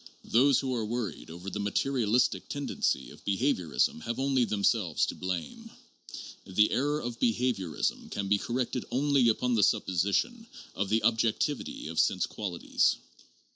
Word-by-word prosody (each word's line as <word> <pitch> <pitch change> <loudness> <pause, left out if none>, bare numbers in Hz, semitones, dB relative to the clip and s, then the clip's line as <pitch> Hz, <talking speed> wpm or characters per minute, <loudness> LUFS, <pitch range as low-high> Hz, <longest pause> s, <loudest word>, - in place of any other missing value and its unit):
Those 135 +3 +4
who 130 -2 -2
are 115 -3 -1
worried 110 - -4
over 90 +4 -7
the 105 - -4
material 110 +2 0
istic 125 - +2
tendency 145 0 -1
of - - -15
behaviorism 95 - 0
have 115 +7 -4
only 135 -2 +2
themselves 100 -5 +1
to - - -4
blame; 90 -5 -5 0.7
the 105 +3 +2
error 145 +3 +1
of 120 -2 -5
behaviorism 115 - -1
can 100 -1 -3
be 100 +1 +2
corrected 125 +1 -2
only 135 -2 +3
upon 125 +2 +1
the 110 - +3
supposition 100 - +1 0.3
of 100 0 -2
the 110 +1 +2
objectivity 115 - 0
of 80 +1 -3
sense - - +2
qualities. 95 -5 0
115 Hz, 145 wpm, -29 LUFS, 100-130 Hz, 0.7 s, Those